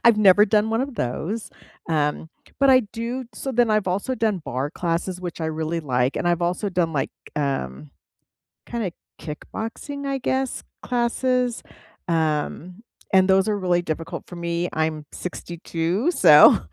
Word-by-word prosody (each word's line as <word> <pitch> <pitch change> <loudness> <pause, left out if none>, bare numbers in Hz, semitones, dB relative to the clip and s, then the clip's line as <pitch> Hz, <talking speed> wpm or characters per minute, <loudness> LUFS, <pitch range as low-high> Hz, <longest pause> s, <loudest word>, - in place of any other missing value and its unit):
I've 235 -2 +7
never 210 0 +6
done 215 +1 +2
one 225 +2 +1
of 270 -1 -3
those. 175 - -3 0.4
um, 155 0 0 0.3
but 275 -1 +5
I 255 0 +7
do 240 +3 -3
so 270 - -4
then 240 -2 +3
I've 215 -2 +2
also 200 +8 -1
done 220 -5 0
barre 130 +4 -2
classes, 175 +2 -2
which 175 -2 -6
I 160 - -1
really 160 +1 -2
like, 125 -2 0
and - - -1
I've 175 0 +1
also 180 +4 0
done, 175 -3 0
like, 140 - -1 0.3
um, 75 - -2 0.8
kinda 225 -7 -3 0.3
kickboxing, 225 - -6
I 275 -1 -1
guess, 265 0 -1 0.2
classes, 250 0 0 0.5
um, 165 +4 -1 0.3
and 190 0 +5
those 190 +1 +4
are 210 - +1
really 180 -2 +1
difficult 165 0 -4
for 175 - -9
me. 170 0 -2
I'm 155 -1 -1
62, 175 - -2
so, 155 - +8
180 Hz, 155 wpm, -23 LUFS, 160-230 Hz, 0.8 s, so